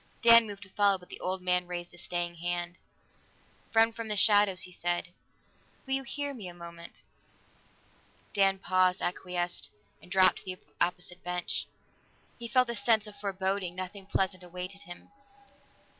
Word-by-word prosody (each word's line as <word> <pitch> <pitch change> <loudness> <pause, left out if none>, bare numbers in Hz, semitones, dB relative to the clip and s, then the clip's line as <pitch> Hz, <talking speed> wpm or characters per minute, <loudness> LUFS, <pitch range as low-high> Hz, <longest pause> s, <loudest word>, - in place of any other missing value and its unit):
Dan 230 -1 +9
moved 200 -1 -7
to 195 - -13
follow, 200 0 +3
but 180 -1 -18
the - - -9
old 185 0 -2
man 180 -1 +2
raised 175 -1 -5
a - - -13
staying 175 -1 -3
hand. 175 +1 -3 0.9
"Friend 225 0 +4
from 230 -1 -5
the 210 - 0
shadows," 205 -1 +5
he 180 - -6
said, 175 0 -2 0.8
"will 265 - -1
you 270 - +2
hear 285 +2 -4
me 215 -8 -8
a 175 - -9
moment?" 170 0 -11 1.3
Dan 195 -1 +3
paused, 185 -1 +2
acquiesced, 175 -1 -2 0.3
and - - -16
dropped 185 0 +5
to - - -8
the 185 -1 -5 0.3
opposite 180 0 -3
bench. 180 0 -1 0.7
He 235 - -5
felt 255 0 +3
a - - -4
sense 220 0 +2
of 210 -1 -9
foreboding; 190 -2 -1
nothing 185 +1 -6
pleasant 190 -2 0
awaited 180 +2 -6
him. 175 -3 -11
185 Hz, 160 wpm, -30 LUFS, 180-205 Hz, 1.3 s, Dan